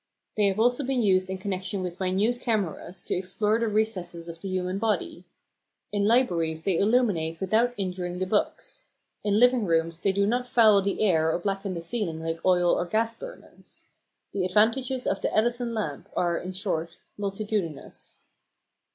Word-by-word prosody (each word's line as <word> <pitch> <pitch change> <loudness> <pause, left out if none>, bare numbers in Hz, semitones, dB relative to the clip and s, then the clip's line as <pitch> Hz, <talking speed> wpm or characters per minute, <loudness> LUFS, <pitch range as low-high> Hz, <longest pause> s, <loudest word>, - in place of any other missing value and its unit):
They 210 -1 +3
have 195 +1 0
also 245 +5 +3
been 255 -2 0
used 185 -2 +3
in 190 - -2
connection 190 0 -3
with 180 0 -5
minute 195 +6 +1
cameras 190 -6 -2
to - - -2
explore 210 +4 0
the 230 - 0
recesses 185 -6 -1
of 165 0 -9
the 195 - -5
human 185 +1 -2
body. 200 -4 -1 0.7
In 205 -1 0
libraries 170 -10 +2
they 185 -2 +1
illuminate 200 -8 +1
without 225 +6 +2
injuring 180 -2 -3
the 185 - -1
books. 210 - -1 0.4
In 205 0 +2
living 245 -1 +5
rooms 165 -2 0
they 195 - +2
do 200 +1 +1
not 245 +4 0
foul 220 -5 +5
the 200 +2 -1
air 160 -5 +3
or - - 0
blacken 195 +1 -3
the 170 - -4
ceiling 170 -3 -3
like 165 0 -3
oil 180 -1 +4
or 175 - 0
gas 225 +4 +1
burners. - - -12 0.5
The 195 - -1
advantages 230 +7 +2
of 195 - -1
the - - 0
"Edison 240 +2 +1
lamp" 155 -10 -4
are, 175 -1 +1
in 185 +2 -4
short, 170 -3 -3 0.2
multitudinous. 200 -6 -4
195 Hz, 170 wpm, -26 LUFS, 180-220 Hz, 0.7 s, living